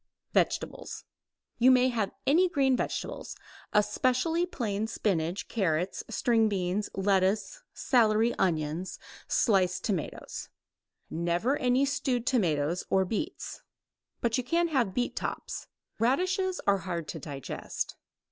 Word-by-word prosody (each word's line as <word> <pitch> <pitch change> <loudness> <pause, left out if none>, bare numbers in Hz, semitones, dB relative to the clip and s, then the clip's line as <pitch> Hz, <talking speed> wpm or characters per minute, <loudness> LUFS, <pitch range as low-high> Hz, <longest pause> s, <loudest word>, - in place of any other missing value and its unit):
Vegetables. - - -1 0.6
You 245 +2 +6
may 255 0 +5
have 220 -5 0 0.2
any 350 +7 +4
green 270 -5 +3
vegetables, - - -3 0.4
especially 255 +11 +2
plain 220 - -2
spinach, 190 -3 -1
carrots, 180 -4 0
string 225 -1 +2
beans, 195 +1 -1
lettuce, 195 - +1
celery, 230 -2 +3
onions, 160 0 0 0.3
sliced 185 -4 +2
tomatoes, 190 -8 -3 0.6
never 175 - +1
any 255 0 +2
stewed 270 -4 -1
tomatoes 170 - +1
or 190 0 +3
beets. 265 - -4 0.6
But 235 +1 +1
you - - -1
can 335 +6 +1
have 245 -11 +1
beet 245 0 0
tops. - - -4 0.3
Radishes 370 - +1
are 200 -1 +4
hard 170 -4 -4
to 160 - -5
digest. 140 -3 -5
220 Hz, 115 wpm, -29 LUFS, 185-255 Hz, 0.6 s, You